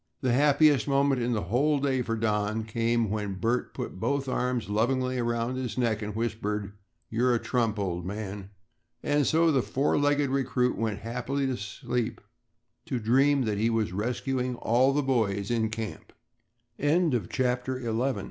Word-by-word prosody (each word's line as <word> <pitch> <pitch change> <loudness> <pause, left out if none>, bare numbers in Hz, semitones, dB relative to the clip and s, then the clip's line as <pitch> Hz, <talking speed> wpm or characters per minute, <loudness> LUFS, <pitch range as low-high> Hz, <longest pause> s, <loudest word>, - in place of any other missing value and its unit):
The 130 -3 +1
happiest 145 0 +4
moment 140 -2 +2
in 120 +1 0
the 105 - -1
whole 135 - +2
day 135 -2 +1
for 115 -2 -2
Don 110 0 0
came 115 0 0
when 105 -2 -2
Bert 115 +6 -1
put - - -5
both 140 +5 -1
arms 125 -3 -1
lovingly 125 +4 0
around 120 +1 -1
his 125 -5 -4
neck 115 -3 +1
and 105 -1 -5
whispered, 105 -3 -2 0.4
"You're 120 +2 +2
a - - +1
trump, 115 -4 0
old 90 -4 -2
man." 100 0 -5 0.5
And 145 -2 +2
so 165 +1 +4
the 135 -3 +3
four 135 +5 0
legged 145 -1 +2
recruit 130 -2 +1
went 110 -2 -2
happily 125 +4 -2
to 130 -1 0
sleep 110 +2 -3 0.7
to 130 - -1
dream 135 +5 +3
that 105 -3 -1
he 115 +2 +2
was 110 -5 0
rescuing 125 +4 -2
all 125 +4 +3
the 145 +1 +1
boys 110 -6 0
in 110 -2 +1
camp. 110 -1 -6 0.7
CHAPTER 130 - +1
XII - - -9
THE 115 - -1
YOUNGST 125 +1 0
120 Hz, 165 wpm, -28 LUFS, 110-135 Hz, 0.7 s, happiest